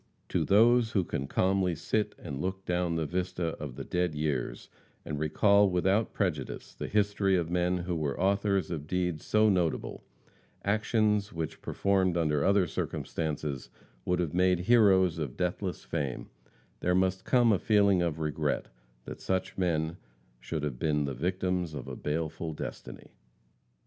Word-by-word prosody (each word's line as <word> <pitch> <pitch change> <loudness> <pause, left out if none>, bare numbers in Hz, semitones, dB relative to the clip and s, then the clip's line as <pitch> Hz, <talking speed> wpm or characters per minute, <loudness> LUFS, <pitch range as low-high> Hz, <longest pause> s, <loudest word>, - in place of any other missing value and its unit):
To - - +1
those 115 +3 +4
who 95 - +2
can 70 -4 -3
calmly 95 0 +1
sit 105 +6 -1
and 70 0 -6
look 95 +1 -3
down 90 -1 0
the 80 -1 0
vista 90 0 -2
of 70 -5 -6
the - - -6
dead 90 -3 -1
years 75 -5 -2 0.4
and 75 - -4
recall 100 +6 +4
without 95 +4 +1
prejudice 85 -10 -3
the - - -5
history 100 -2 +2
of 85 -1 -2
men 90 +1 +1
who 90 0 -3
were 75 -4 -2
authors 100 0 +1
of 75 -3 -4
deeds 90 -3 -1
so 110 0 +3
notable 85 - 0 0.6
actions 105 0 +1
which, 80 -2 -5
performed 95 -3 +1
under 75 -4 +1
other 100 -1 +4
circumstances, 75 -6 -3 0.3
would 90 +5 +1
have 85 -4 -1
made 90 0 +3
heroes 95 -5 +4
of 70 -6 -4
deathless 90 +1 -2
fame, 70 -4 -4 0.5
there 90 0 +1
must 95 0 +1
come 120 -3 +4
a 95 - +1
feeling 100 -4 +3
of 85 -3 -1
regret 75 -3 -1 0.4
that - - -8
such 95 -1 -2
men 85 -2 0 0.4
should 75 +5 -4
have 70 -5 -3
been 75 -2 +1
the 70 - -3
victims 90 +2 -1
of - - -6
a - - -5
baleful 80 +1 -3
destiny. - - -8
90 Hz, 155 wpm, -29 LUFS, 80-95 Hz, 0.6 s, those